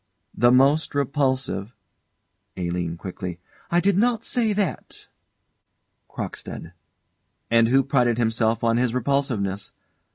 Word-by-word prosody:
The 120 +2 +4
most 140 +5 +3
repulsive 130 -6 -1 0.8
ALINE. 85 -2 -3
[Quickly.] 90 -1 -6 0.3
I 175 - +3
did 195 +1 +2
not 230 0 +1
say 230 -3 0
that. 205 -2 -3 1.0
CROCKSTEAD. 80 - -7 0.8
And 115 0 +5
who 135 +3 +4
prided 125 -4 +2
himself 115 -1 +1
on 115 0 +2
his 125 -1 0
repulsiveness. 120 -7 -1
125 Hz, 105 wpm, -23 LUFS, 110-140 Hz, 1.0 s, And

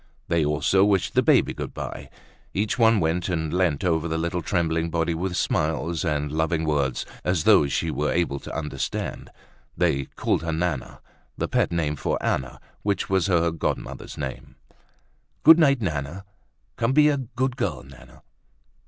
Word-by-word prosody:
They 85 -2 +2
also 75 +6 +2
wished 95 -2 +2
the - - +4
baby - - +3
good - - -6
bye. - - -6 0.5
Each 105 +5 -1
one 115 -2 +5
went 85 +2 0
and 80 -3 -2
leant 90 -6 +1
over 85 -2 +1
the 80 0 -2
little 85 +2 -2
trembling 85 -1 0
body 85 0 0
with 90 +2 -2
smiles 80 0 0
and 75 -3 -1
loving 80 +1 0
words 70 -4 0 0.2
as 90 -4 0
though 70 - +5
she 70 - -1
were 75 +3 -1
able 85 -5 0
to - - -8
understand. 75 -4 -4 0.5
They 80 -7 +1
called - - -1
her 80 0 -2
Nana, 80 -4 -3 0.4
the - - -1
pet - - +1
name 75 -3 -1
for - - -1
Anna, 65 - -2 0.2
which 100 -1 -1
was 95 -2 +2
her 85 -3 +2
godmother's 80 - -4
name. - - -6 0.9
"Good 160 +2 +9
night, 140 -5 +4
Nana. 80 +3 -3 0.5
Come 115 +3 +1
be 150 +1 +6
a 145 -1 +2
good 130 0 -2
girl, 90 - -2
Nana." 65 -2 -16
85 Hz, 165 wpm, -24 LUFS, 75-95 Hz, 0.9 s, Good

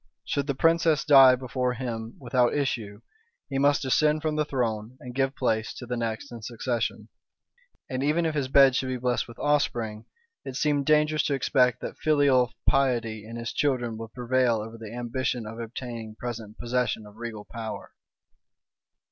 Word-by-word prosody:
Should 140 -1 -1
the 140 - -1
princess 165 0 +3
die 135 -3 +8
before 125 0 -2
him 115 -2 -5
without 125 -1 +1
issue, 115 -7 -2 0.5
he 135 -1 -1
must 145 +1 +3
descend 150 +3 +2
from 155 -1 0
the 155 - +2
throne, 120 -4 -2
and 125 0 -9
give 135 +1 0
place 110 -4 -1
to 125 - -8
the 125 0 -3
next 115 +2 -3
in 120 -1 -8
succession; 120 +1 -3 0.8
and 130 0 -3
even 155 +4 +1
if 160 - 0
his 145 -3 -1
bed 135 -1 +6
should 130 - 0
be 130 0 -2
blest 125 0 -1
with 120 - -12
offspring, 120 -7 0 0.4
it 130 - -7
seemed 145 -1 +1
dangerous 150 0 +4
to 140 - +1
expect 125 -2 +2
that - - -6
filial 140 -5 +3 0.2
piety 115 -5 +1
in 115 - -8
his 120 0 -4
children 125 -5 0
would 115 -1 -7
prevail 125 -1 +2
over 110 +1 -5
the 110 -2 -8
ambition 120 0 -2
of 110 +2 -8
obtaining 115 -1 -6
present 115 -3 -6
possession 120 -2 -1
of 105 +1 -15
regal 110 -3 -6
power. 110 -3 -7
125 Hz, 175 wpm, -26 LUFS, 115-140 Hz, 0.8 s, die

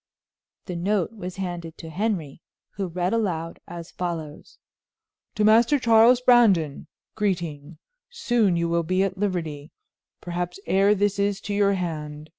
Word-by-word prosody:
The 180 - -5
note 195 +3 0
was 185 -4 -7
handed 175 -3 -5
to 165 -1 -9
Henry, 175 -6 -2 0.3
who 195 -1 -4
read 180 +3 -2
aloud 170 -7 -2
as 170 0 -9
follows: 165 -4 -6 0.8
"To 210 - +1
Master 230 +6 +5
Charles 235 0 +5
Brandon": 205 - +3 0.3
"Greeting 170 -6 -3 0.3
Soon 240 - +1
you 170 0 0
will 170 0 +1
be 185 +3 +1
at 190 -1 -3
liberty; 165 -7 -3 0.5
perhaps 175 +1 -4
ere 195 +2 +3
this 205 0 0
is 200 -1 0
to 205 - -4
your 200 -1 +3
hand. 155 -4 -5
180 Hz, 140 wpm, -24 LUFS, 165-205 Hz, 0.8 s, Master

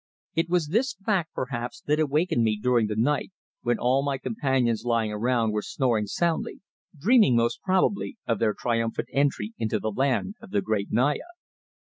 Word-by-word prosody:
It 165 +1 0
was 175 -4 +1
this 240 +9 +1
fact, 195 -4 -1
perhaps, 120 -2 -4
that 150 +1 0
awakened 150 -3 +1
me 110 -2 +1
during 120 -1 +2
the 105 - -3
night, 140 - 0 0.3
when 120 -1 +1
all 130 +2 +2
my 140 -1 -1
companions 125 -2 0
lying 115 -3 +1
around 115 +1 +1
were 105 0 -1
snoring 115 -3 0
soundly, 170 +9 -1 0.4
dreaming 210 - +5
most 115 0 +1
probably, 190 +4 0
of 115 -3 0
their 110 -2 +1
triumphant 115 -1 -1
entry 135 -5 0
into 110 -1 0
the 110 - -2
land 135 - 0
of - - -12
the 205 +1 +1
great 105 - -1
Naya. 145 - +1
125 Hz, 170 wpm, -26 LUFS, 115-155 Hz, 0.4 s, dreaming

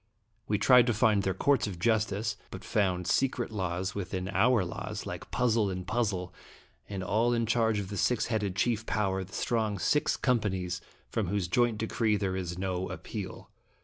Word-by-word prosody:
We - - +1
tried 125 -1 +6
to 120 - +2
find 110 -2 +4
their 95 -2 -1
courts 135 +2 +2
of 95 -4 -5
justice, 110 +1 +1
but - - -8
found 90 -4 0
secret 125 +2 +1
laws 95 -2 -2
within 95 -1 -4
our 110 +1 +3
laws, 85 - -5
like - - -6
puzzle 115 -4 +2
in 90 -1 -4
puzzle, 100 -5 -1 0.6
and 95 -2 -4
all 110 +5 +2
in 115 -1 +1
charge 115 -1 +2
of 100 -2 -3
the 100 - -5
six 125 +4 +2
headed 105 -5 -1
chief 110 +1 0
power, 95 -3 0
the 95 - -14
strong 110 -4 0
Six 150 +10 +1
Companies, 95 -8 0 0.3
from 110 -5 -1
whose 95 -1 -1
joint 120 +4 +2
decree 110 0 +1
there 95 -2 -1
is 90 -2 -4
no 95 -1 -2
appeal. 95 +2 -7
105 Hz, 180 wpm, -30 LUFS, 95-115 Hz, 0.6 s, tried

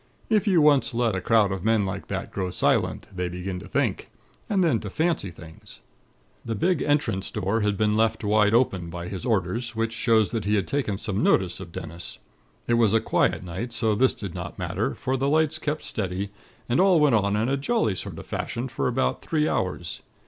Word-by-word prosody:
If 215 -1 +3
you 180 -5 +5
once 145 -5 +4
let 115 -2 +1
a 95 - -2
crowd 105 -1 +3
of 95 -2 -4
men 110 -2 +2
like 95 0 -5
that - - -4
grow 95 -2 -2
silent, - - +1
they 90 -1 -2
begin 90 +1 -5
to 100 - -11
think, - - -1 0.4
and 195 -3 +2
then 145 -10 +2
to 105 - -6
fancy 160 - 0
things. 80 -1 -13 0.6
"The 115 -1 -3
big 175 - +1
entrance 145 -10 0
door 105 +2 -1
had 105 -1 +1
been 105 0 +2
left 110 0 +1
wide 105 +1 +3
open, 95 -9 +1
by 85 +1 -6
his 95 +4 -5
orders; 110 +3 -1
which 115 0 -1
shows 110 -2 +2
that 115 -4 -2
he 105 +1 +2
had 100 -3 0
taken 130 -9 -1
some 100 0 -2
notice 90 -1 +2
of 90 -3 -9
Dennis. 85 -1 -7 0.5
It 120 0 +2
was 110 -2 +4
a - - +5
quiet - - +1
night, 95 +7 -5
so 110 -1 +2
this 130 +5 +3
did 100 -5 -6
not - - -6
matter, - - -2
for 130 +1 -1
the 135 +2 0
lights 155 0 +2
kept 150 0 -2
steady, 95 -1 -3 0.4
and 120 - +1
all 190 -3 +5
went 150 -4 +4
on 100 -2 +2
in 110 +3 +1
a 135 - +1
jolly 140 - +1
sort 95 - -6
of - - -8
fashion 120 +3 -4
for 130 - -1
about 125 +1 0
three 155 -1 0
hours. 90 -3 -2
110 Hz, 215 wpm, -25 LUFS, 95-130 Hz, 0.6 s, you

